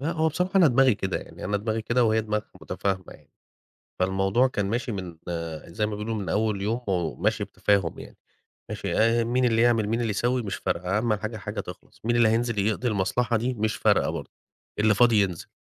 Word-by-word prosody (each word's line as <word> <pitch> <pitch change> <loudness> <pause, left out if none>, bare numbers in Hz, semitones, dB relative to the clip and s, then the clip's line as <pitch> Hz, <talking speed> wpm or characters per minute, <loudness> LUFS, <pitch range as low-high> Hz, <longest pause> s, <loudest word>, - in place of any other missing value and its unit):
لأ 155 +5 -1
هو 160 0 +1
بصراحة 180 +4 -1
أنا 185 -3 +7
دماغي 130 -2 +4
كده، 95 -1 -2
يعني - - -10
أنا 100 +2 0
دماغي 110 +2 -2
كده 120 +2 +2
وهي 110 0 +3
دماغها 105 0 -3
متفاهمة 95 -2 -2
يعني، - - -19 0.7
فالموضوع 95 +7 +2
كان 100 -5 -2
ماشي 120 +3 -2
من 90 -4 -6 0.5
زي 105 +5 -2
ما - - -4
بيقولوا 105 +2 -3
من 100 -5 -4
أوّل 105 +1 0
يوم، 115 +4 -1
وماشي 90 -5 0
بتفاهم 100 -5 0
يعني، - - -11 0.5
ماشي - - -3
آآ، 115 +1 +3
مين 125 +2 +1
اللي 115 -1 +3
يعمل 115 -3 +3
مين 115 +2 0
اللي 115 - -1
يسوّي، 120 +5 0
مش 100 -4 -4
فارقة، 90 +4 -1
أهم 110 0 +1
حاجة 110 +2 -4
الحاجة 105 - -5
تِخلَص، - - -9
مين 120 +2 +1
اللي 115 -2 +5
هينزل 115 -1 0
يقضي 110 +5 0
المصلحة 115 +3 +1
دي؟ 125 +3 -1
مش 110 -2 -1
فارقة - - +2
برضه، - - -5 0.5
اللي 110 0 +4
فاضي 115 -1 +5
ينزل، 90 -4 -2
110 Hz, 205 wpm, -26 LUFS, 100-120 Hz, 0.7 s, أنا